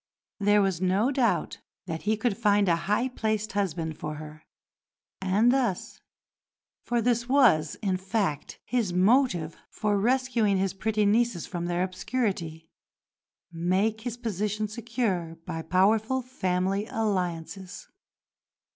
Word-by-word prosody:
There 205 0 +4
was 190 -3 -1
no 195 +7 +2
doubt 255 -5 0 0.3
that 165 -3 -4
he 215 - +2
could 220 -1 0
find 205 -2 +3
a 170 - +4
high 225 +5 +2
placed 215 -4 -2
husband 165 -6 -2
for 150 0 -4
her, 155 0 -11 0.7
and 200 +5 +3
thus 250 -8 -1 0.8
for 240 -1 -1
this 235 0 +1
was, 230 - +4
in 190 -2 +1
fact, 190 -6 -2
his 230 -8 -1
motive 185 - +2
for 205 -1 0
rescuing 240 -3 +2
his 190 0 0
pretty 215 +2 0
nieces 215 -3 +2
from 175 -2 -4
their 175 +1 0
obscurity 185 -5 -3 0.8
make 190 +6 0
his 240 0 -5
position 210 -2 -2
secure 215 -7 -2
by 165 - -4
powerful 220 +9 +2
family 195 -4 -1
alliances. 185 -3 -3
205 Hz, 125 wpm, -27 LUFS, 180-230 Hz, 0.8 s, There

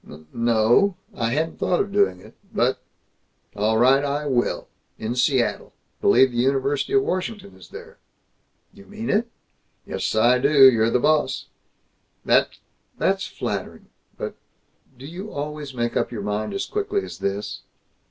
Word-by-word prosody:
"N 75 +1 -13
no, 120 - +3 0.2
I 115 -1 -1
hadn't 160 +3 -2
thought 180 - +1
of 200 - -1
doing 200 - +2
it, - - -15 0.2
but - - 0 0.7
All 110 +2 +1
right. 130 +4 +5
I 145 +1 -2
will! 125 -4 0 0.3
In 110 +2 -3
Seattle! 125 0 0 0.3
B'lieve 130 -1 +5
the 120 - -6
University 135 - 0
of 405 0 +4
Washington 200 - -4
is - - -15
there." 465 +2 -12 0.7
"You 200 -2 -16
mean 215 +2 -4
it?" 225 +3 +1 0.6
"Yes. - - -3
I 120 +3 +4
do. 140 0 +7
You're 115 -1 +2
the 120 - +2
boss." 145 0 +1 0.8
"That's - - +2 0.4
that's - - 0
flattering, - - -5 0.3
but - - -5 0.6
Do 130 - -11
you 185 +8 -8
always 145 -1 -6
make 120 -1 -2
up - - 0
your 110 -4 -5
mind 105 - -3
as 195 - -2
quickly 405 -1 -2
as - - -9
this?" 100 +1 -3
135 Hz, 150 wpm, -23 LUFS, 120-195 Hz, 0.8 s, do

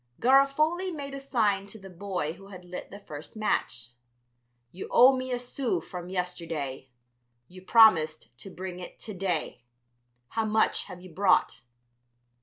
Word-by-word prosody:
Garofoli 305 +8 +3
made 280 -4 -6
a 275 - -5
sign 215 -8 0
to 210 - -7
the 195 -2 -12
boy 180 -4 -4
who 195 +3 -15
had 185 -2 -11
lit 180 0 -8
the 200 - -9
first 155 -4 -10
match. 125 - -2 0.8
"You 185 - -7
owe 260 +2 +7
me 255 0 -4
a 245 - 0
sou 245 -5 -2
from 175 +2 -8
yesterday; 165 -8 -4 0.6
you 185 +3 -13
promised 165 - +4
to - - -9
bring 185 -1 -7
it 180 - -9
to 215 - -7
day. 180 -9 -3 0.7
How 225 -1 -1
much 215 0 +2
have 180 - -10
you 185 -2 -13
brought?" 190 +1 +2
195 Hz, 155 wpm, -28 LUFS, 175-240 Hz, 0.8 s, owe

